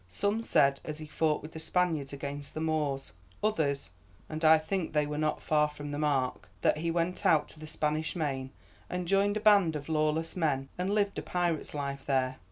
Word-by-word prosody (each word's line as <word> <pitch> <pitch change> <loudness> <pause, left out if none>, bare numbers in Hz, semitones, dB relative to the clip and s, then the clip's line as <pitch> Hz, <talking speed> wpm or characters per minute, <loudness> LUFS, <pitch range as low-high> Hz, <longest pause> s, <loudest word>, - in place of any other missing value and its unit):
Some 200 - 0
said 140 -10 +3
as 155 -1 -5
he 155 - -7
fought 155 0 0
with 155 - -8
the 160 - -8
Spaniards 160 -4 0
against 140 0 -6
the - - -2
Moors; 150 -4 -1 0.3
others, 145 - 0 0.4
and 155 +1 -5
I 160 0 +8
think 160 +2 -2
they 150 -1 +3
were 150 0 -3
not 155 0 0
far 150 -1 +3
from 145 -1 -7
the 145 - -3
mark, 135 -10 0
that - - +3
he 170 +1 -1
went 170 +2 -1
out 150 -2 +4
to 155 - -13
the 155 - -8
Spanish 155 +1 -1
Main, 135 -5 -2 0.4
and 180 -1 -3
joined 200 +2 +3
a - - -3
band 200 -7 +5
of 145 +1 -5
lawless 155 +1 0
men, 135 -6 0
and 180 +2 -2
lived 205 -1 +1
a - - -4
pirate's 175 -4 -1
life 140 -1 -4
there. 130 -1 +1
155 Hz, 205 wpm, -30 LUFS, 145-170 Hz, 0.4 s, I